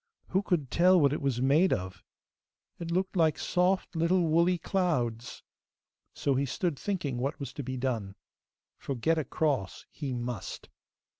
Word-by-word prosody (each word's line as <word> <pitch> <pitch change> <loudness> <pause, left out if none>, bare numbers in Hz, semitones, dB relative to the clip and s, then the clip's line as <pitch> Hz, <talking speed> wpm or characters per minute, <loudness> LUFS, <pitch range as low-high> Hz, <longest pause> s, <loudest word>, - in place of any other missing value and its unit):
Who 190 - +2
could 170 -9 -1
tell 180 +1 +5
what 140 -2 +4
it - - -3
was 130 -3 0
made 155 +8 +4
of? 95 -1 -3 0.8
It 170 - -5
looked 185 +3 -1
like 160 -3 +3
soft 180 +1 0
little 170 +3 +2
woolly 170 +3 +3
clouds! 140 - -1 0.7
So 140 - +1
he 135 +1 0
stood 165 +1 -2
thinking 150 -11 -2
what 135 +3 -2
was 135 -2 -6
to 145 - -5
be 130 0 -4
done, 115 -7 -2 0.6
for 140 - -4
get 160 +7 +1
across 140 -8 -1
he 140 -4 -5
must. 120 -4 -5
145 Hz, 155 wpm, -29 LUFS, 125-175 Hz, 0.8 s, tell